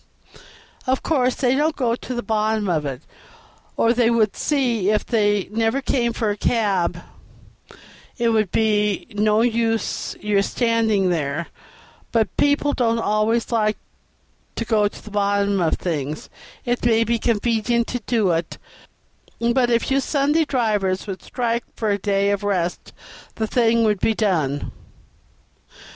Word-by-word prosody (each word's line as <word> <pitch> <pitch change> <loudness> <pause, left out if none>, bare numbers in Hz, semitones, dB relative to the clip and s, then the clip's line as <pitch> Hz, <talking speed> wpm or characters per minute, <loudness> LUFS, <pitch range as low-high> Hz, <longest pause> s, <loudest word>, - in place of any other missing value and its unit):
Of 260 +1 0
course, 255 -5 +1
they 255 -2 +1
don't 305 +3 +1
go 235 -3 0
to 255 - -7
the 240 - -3
bottom 215 -1 0
of 155 -5 0
it, 130 -2 -6 0.7
or 230 - +3
they 240 -1 +3
would 220 -3 +2
see 240 -9 0
if 215 0 +1
they 205 -4 +1
never 225 +4 +1
came 245 -3 0
for 225 -2 -1
a - - -2
cab 200 -7 0 1.1
it 235 -2 +1
would 215 -4 +1
be 210 -2 +1
no 210 +1 +2
use 230 -1 -1
your 205 -1 +1
standing 220 -4 +1
there; 155 0 -2 0.6
but 225 -2 0
people 290 0 +2
don't 230 -2 +1
always 225 +2 0
like 215 -2 +1 0.8
to - - -3
go 210 -3 +2
to - - -10
the 215 - -10
bottom 200 -1 +1
of 165 - +2
things; 155 -4 -4 0.3
it 245 0 -1
may 230 -2 +3
not - - +2
be 235 0 +1
convenient 235 +1 +1
to 245 - -2
do 220 -4 +1
it; 165 0 -2 1.0
but 250 -1 +2
if 235 +2 +1
you 270 - +3
Sunday 295 +3 +1
drivers 210 -8 0
would 190 -3 -6
all - - -17
strike 235 -2 -1
for 220 -2 -1
a 200 - 0
day 200 0 +1
of 200 - -1
rest 180 -4 -2 0.4
the 220 - -1
thing 230 0 +2
would 210 -3 +2
be 220 - +1
done." 160 -10 0
220 Hz, 155 wpm, -21 LUFS, 200-235 Hz, 1.1 s, or